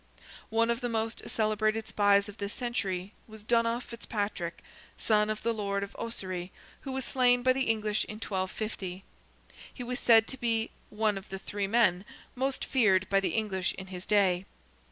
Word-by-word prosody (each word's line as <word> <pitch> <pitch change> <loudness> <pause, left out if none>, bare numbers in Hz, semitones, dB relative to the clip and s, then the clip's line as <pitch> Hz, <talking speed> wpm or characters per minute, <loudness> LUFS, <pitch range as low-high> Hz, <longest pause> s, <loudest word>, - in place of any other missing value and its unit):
One 230 +1 +3
of 235 +2 -2
the 245 - -1
most 225 0 -2
celebrated 215 0 +1
spies 200 0 +4
of 205 +1 -10
this 200 0 -4
century 200 -6 -2
was 215 -1 -11
Donogh 230 +1 +2
Fitzpatrick, 205 -7 -4 0.3
son 210 -1 +2
of 215 0 -3
the 230 0 +1
Lord 200 -2 -1
of 200 - -8
Ossory, 185 -5 -4 0.3
who 270 - -6
was 265 0 -2
slain 245 -1 +3
by 255 0 +5
the 265 0 0
English 215 -1 +1
in 210 - -7
1250. 190 -2 -4 0.7
He 250 - -7
was 250 +1 -3
said 225 -2 +6
to 265 - -6
be 225 -2 0 0.2
"one 210 -2 0
of 195 - -17
the 195 - -4
three 200 +1 -3
men" 195 -4 +3 0.3
most 265 +1 -1
feared 195 -7 +3
by 195 - +5
the 195 - -1
English 200 -5 0
in 190 - -7
his 180 0 -6
day. 195 -3 +3
215 Hz, 175 wpm, -30 LUFS, 195-230 Hz, 0.7 s, said